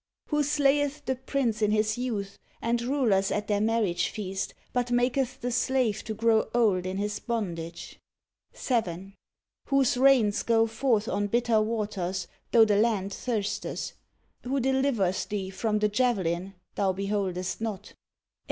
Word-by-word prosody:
Who 300 -1 +2
slayeth 290 0 +1
the 260 - 0
prince 250 -4 -1
in 210 - +3
his 215 0 +2
youth, 220 -6 -4 0.2
and 235 +1 0
rulers 235 -7 +2
at 210 - -1
their 205 -1 0
marriage 215 -6 +1
feast, 195 -2 -4 0.2
but 245 -1 0
maketh 250 +1 0
the 245 - -2
slave 250 -3 +1
to 220 - -4
grow 225 0 +2
old 200 -6 +2
in 185 +1 -3
his 205 +1 -2
bondage; 170 -8 -4 0.5
7. 195 -6 -2 0.5
Whose 275 -3 +2
rains 250 -6 +4
go 225 -1 +3
forth 225 -1 0
on 205 +1 0
bitter 235 0 +2
waters, 205 -5 -2 0.2
tho 225 -1 +7
the 210 -2 +2
land 205 -3 +1
thirsteth; 210 -4 -3 0.5
Who 270 +2 -1
delivereth 265 -8 +1
thee 195 -2 -3
from 215 +2 -1
the 210 0 +2
javelin 195 -5 0 0.2
thou 195 -2 +1
beholdest 195 -1 -2
not; 210 -3 -4
8. - - -23
220 Hz, 145 wpm, -27 LUFS, 195-245 Hz, 0.5 s, tho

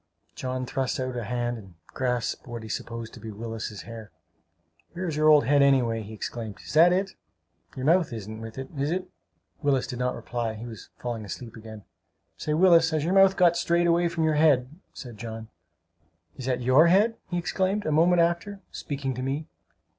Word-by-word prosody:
John 130 0 -3
thrust 130 +3 -2
out 130 -1 -3
a 120 -3 -3
hand 120 +1 -2
and 95 -4 -15 0.2
grasped 125 0 -2
what 120 -2 -6
he 110 - -9
supposed 115 +1 -5
to - - -11
be 110 +1 -8
Willis's 110 -1 -6
hair. 115 -2 -9 0.8
"Where 185 +2 -4
is 160 - -2
your 155 0 +4
old 150 -1 +6
head, 145 +1 +4
anyway!" 125 -5 +3
he 105 0 -9
exclaimed. 110 -1 -6
"Is - - -7
that 165 +3 +7
it? 190 +2 0 0.6
Your 130 - -4
mouth 170 0 +3
isn't 110 -1 -7
with 115 +1 -8
it, 135 0 -6
is 140 +1 -1
it?" 185 +2 -3 0.5
Willis 140 -4 +2
did 125 - -6
not 125 0 0
reply; 115 -2 -3
he 110 +2 -8
was 115 -4 -10
falling 120 -3 -4
asleep 115 +3 -8
again. 110 -2 -10 0.5
"Say, 150 - -2
Willis, 165 -1 +6
has 155 -2 -1
your 175 +4 0
mouth 195 0 +6
got 175 -2 +5
strayed 170 0 +2
away 170 0 +3
from 165 -1 -2
your 160 -1 +3
head?" 145 -5 +4 0.2
said 120 -5 -10
John. 110 -1 -7 0.9
"Is 130 - -7
that 125 -1 0
your 130 +7 +5
head?" 210 +6 +4
he 175 - -2
exclaimed 190 +4 -1
a 155 - 0
moment 170 +3 +4
after, 175 +4 -1
speaking 140 -3 -4
to 125 - -5
me. 135 +4 -2
130 Hz, 200 wpm, -26 LUFS, 115-165 Hz, 0.9 s, that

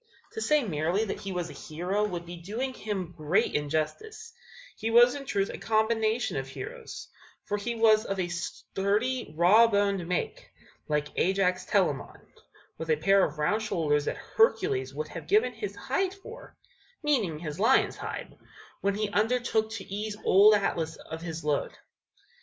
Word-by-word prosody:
To 445 - -5
say 300 -6 +3
merely 175 +2 0
that 200 - -4
he 195 - -5
was 175 -2 -3
a - - -10
hero 180 +6 -2
would 175 -5 -3
be 175 +1 -8
doing 220 +10 -4
him 195 -7 -4
great 155 +3 +1
injustice; 290 - -3 0.4
he 225 - -3
was 240 +2 +6
in 275 -1 -7
truth 200 0 0
a - - -7
combination 220 - +1
of 135 0 -3
heroes; 460 - -8 0.4
for 205 - -1
he 230 +3 -3
was 220 -1 +5
of 195 -1 -3
a 180 - 0
sturdy, 200 +7 -2
raw 205 +7 +7
boned 200 -4 +1
make, 180 - -3 0.4
like 150 -1 0
Ajax 185 -1 +1
Telamon, 180 -9 0 0.6
with 160 - -5
a 155 - +4
pair 195 +5 +4
of 150 - -1
round 205 +9 +1
shoulders 150 -8 0
that - - -2
Hercules 415 -3 +1
would 465 - -5
have - - -8
given 425 +2 +3
his 415 - -5
hide 385 0 -1
for 465 +5 -12 0.5
(meaning 230 - +1
his 155 0 -6
lion's 220 - +3
hide) - - -6 0.5
when 200 0 +1
he 215 0 -1
undertook 220 0 +1
to 215 -3 -5
ease 210 +1 -4
old 205 +3 +7
Atlas 165 -5 -1
of 160 +1 -9
his 165 -2 -5
load. 150 -1 0
200 Hz, 165 wpm, -28 LUFS, 170-230 Hz, 0.6 s, raw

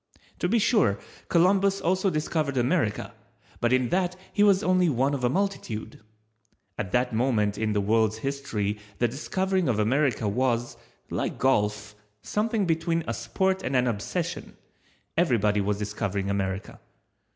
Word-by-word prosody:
To 175 - 0
be 230 - +3
sure, 210 - +3 0.3
Columbus 195 +3 +3
also 190 +3 +1
discovered 155 -3 -1
America, 125 -3 0 0.5
but 120 - +1
in 130 -1 +2
that 180 0 0 0.2
he 205 - +1
was 200 -1 +5
only 185 -1 +3
one 135 +1 +1
of 135 -3 -3
a 125 - +3
multitude. 165 - -3 0.8
At 90 - -4
that 125 0 +1
moment 110 -4 +1
in 110 0 -1
the 105 - +1
world's 110 +1 +2
history 110 -6 -3 0.2
the 120 - +2
discovering 185 - -1
of 115 - +1
America 115 0 +1
was, 120 +2 0 0.4
like - - -2
golf, 105 -4 +1 0.3
something 215 -1 0
between 165 0 0
a 115 - -1
sport 190 +13 -1
and 135 - -2
an 125 0 +3
obsession, 150 - -3 0.6
everybody 110 - +2
was 100 0 0
discovering 100 -1 -2
America. 95 0 -3
130 Hz, 145 wpm, -26 LUFS, 105-180 Hz, 0.8 s, was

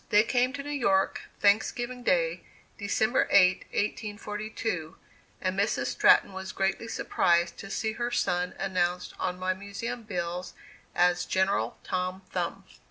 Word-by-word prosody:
They 210 +1 +6
came 250 +2 +2
to 280 0 -5
New 290 - -5
York, 195 -9 +1 0.2
Thanksgiving 240 +4 +2
day, 170 -5 +1 0.4
December 220 +4 +2
8, 185 -1 +5
1842, 210 -4 -3 0.4
and 185 0 -1
Mrs. 205 +2 +1
Stratton - - +5
was 190 0 -5
greatly 195 +4 -1
surprised 170 -5 +1
to 195 - -8
see 220 +2 -1
her 240 +2 -2
son 180 -6 0
announced 180 -2 -1
on 180 -1 -1
my 185 0 0
Museum 200 +5 -5
bills 180 -4 -4 0.4
as 180 0 +3
"General 190 +1 +1
Tom 185 +1 -2
Thumb." - - -2
195 Hz, 135 wpm, -28 LUFS, 180-220 Hz, 0.4 s, They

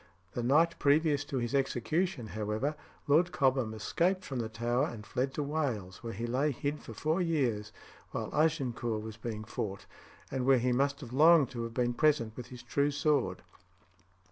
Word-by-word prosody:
The 120 - -3
night 160 +7 +3
previous 145 0 +3
to 140 - -3
his 120 +1 -2
execution, 135 - 0
however, 110 +7 -2 0.3
Lord 165 +5 +4
Cobham 130 -8 +2
escaped 175 - 0
from 130 -3 -4
the 115 -1 -2
Tower 120 +2 0
and 110 -3 -8
fled 130 +4 -1
to 150 - -1
Wales, 130 -11 -2
where 115 -1 -5
he 115 +2 -4
lay 130 +5 +1
hid 145 +2 -2
for - - -10
four 160 +4 0
years 125 -11 0 0.4
while - - -4
Agincourt 120 -8 0
was 110 0 -7
being 110 -2 -5
fought, 100 -2 -5 0.5
and 130 -1 -1
where 135 +1 +5
he 125 +1 +1
must 140 +3 +1
have 125 -3 -8
longed 155 0 +6
to 120 - -4
have 115 0 -5
been 120 -1 +1
present 120 -5 +2
with 125 -1 -7
his 125 -1 -10
true 140 +4 +1
sword. 140 -9 0
130 Hz, 180 wpm, -31 LUFS, 115-150 Hz, 0.5 s, longed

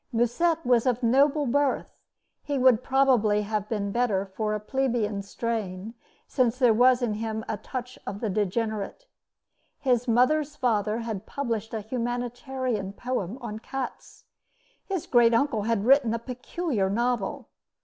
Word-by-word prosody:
Musset 275 +8 +1
was 245 -1 +3
of 250 0 +1
noble 275 +5 +3
birth. 280 +2 0 0.5
He 285 -1 -2
would 255 -3 +5
probably 250 -6 +3
have 210 0 -3
been 200 -3 -2
better 210 -4 +1
for 210 +2 -2
a - - -2
plebeian 225 -3 -1
strain, 205 -1 -4 0.3
since 250 -3 +1
there 250 -4 +5
was 250 +2 +4
in 225 -3 0
him 220 0 -4
a 215 - -2
touch 255 +1 -7
of 200 +1 -4
the 225 - -2
degenerate. 215 - -2 0.7
His 250 -2 +1
mother's 285 +5 +2
father 220 -3 0
had 220 -3 -5
published 230 -6 -3
a 220 - -2
humanitarian 245 -1 -3
poem 245 -3 -3
on 220 -3 -5
cats. 265 +3 -7 0.6
His 385 -5 -3
great 235 -2 +4
uncle 235 -3 +1
had 220 -3 +1
written 255 -3 +4
a - - 0
peculiar 250 - -2
novel. 235 0 -1
235 Hz, 145 wpm, -26 LUFS, 215-255 Hz, 0.7 s, would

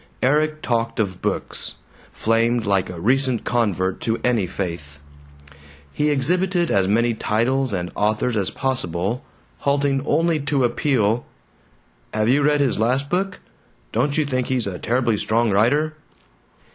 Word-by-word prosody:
Erik 155 +3 +1
talked 115 -1 -1
of 95 -4 -1
books; - - -2 0.4
flamed 115 +1 +1
like 100 -2 +1
a 90 -2 -7
recent 130 +4 +2
convert 95 -6 0
to 115 0 -1
any 115 -6 +1
faith. 85 -6 -5 1.0
He 150 0 +1
exhibited 175 +5 +1
as 95 -1 +2
many 115 +3 +2
titles 125 +5 0
and 90 -3 -3
authors 110 +3 0
as 100 -5 0
possible, 115 - -2 0.4
halting 140 -1 +1
only 165 +1 +2
to 140 -1 0
appeal, 120 -2 +1 0.9
"Have 110 +1 +1
you 140 +3 +4
read 145 0 +3
his 135 -6 +1
last 130 +5 0
book? 185 +1 -1 0.5
Don't 145 0 0
you 155 - +2
think 130 -3 -1
he's 130 -3 0
a 90 -3 -5
terribly 120 -2 +1
strong 115 +2 +1
writer?" 145 +10 +2
120 Hz, 140 wpm, -22 LUFS, 105-140 Hz, 1.0 s, you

